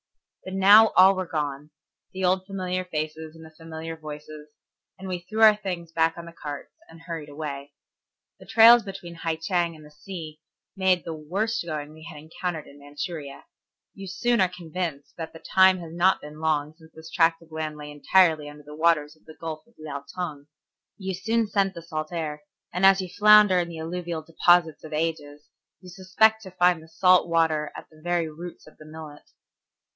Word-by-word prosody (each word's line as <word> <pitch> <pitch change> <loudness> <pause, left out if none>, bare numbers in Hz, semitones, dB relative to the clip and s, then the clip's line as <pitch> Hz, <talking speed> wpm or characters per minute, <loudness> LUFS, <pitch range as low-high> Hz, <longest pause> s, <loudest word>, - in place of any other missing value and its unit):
But 190 0 -6
now 205 +3 +8
all 190 +1 +8
were 185 -2 -4
gone, 150 -2 -3 0.4
the 190 0 -2
old 185 +1 +1
familiar 185 -2 -3
faces 155 -1 -5
and 160 0 -13
the 160 - -14
familiar 165 0 -7
voices, 150 -1 -10 0.5
and 190 - -9
we 180 -1 -3
threw 215 +6 -5
our 215 -1 +8
things 180 -5 -6
back 165 0 +1
on 170 - -8
the 170 - -11
carts 145 -3 -8 0.2
and 165 0 -14
hurried 165 -3 -7
away. 145 -1 -7 0.7
The - - -15
trails 235 +1 +8
between 195 -4 -9
Hai 165 -1 -3
Cheng 170 0 -1
and 155 -1 -14
the 150 - -15
sea 155 -1 -9 0.3
made 190 -2 +2
the 165 - -4
worst 195 +8 -2
going 155 -2 -5
we 160 0 -14
had 160 - -10
encountered 160 +1 -5
in 140 - -16
Manchuria. 145 0 -7 0.5
You 195 0 -9
soon 235 +5 +1
are 185 - +3
convinced 165 -4 -5
that 165 -1 -6
the - - -10 0.2
time 190 0 +6
has 165 -2 -9
not 175 +2 +3
been 150 +1 -11
long 155 -1 0
since 160 -1 -19
this 160 +1 -12
tract 165 -1 +2
of 165 - -22
land 155 -1 -4
lay 150 0 -8
entirely 155 0 +3
under 150 0 -13
the 150 +1 -11
waters 155 -2 +2
of 155 - -31
the 155 - -14
Gulf 160 +4 -6
of 235 - -28
Liaotung. 150 0 -6 0.5
You 190 -2 -4
soon 225 +5 0
scent 195 -2 0
the 170 - -8
salt 155 -1 -5
air, 155 -3 -4 0.3
and 180 +2 -2
as 195 0 +5
you 185 - -5
flounder 210 -1 +6
in 170 -1 -2
the 165 - -8
alluvial 170 0 -4
deposits 165 0 +2
of 155 - -9
ages, 150 -2 -3 0.3
you 180 -1 -12
expect 220 +3 +3
to 195 - -10
find 180 -2 +2
the 160 - -15
salt 180 +2 +4
water 160 -2 +1
at - - -12
the 155 0 -19
very 175 0 0
roots 165 +3 -10
of 155 - -18
the 155 - -13
millet. 155 -1 -11
165 Hz, 195 wpm, -25 LUFS, 155-185 Hz, 0.7 s, now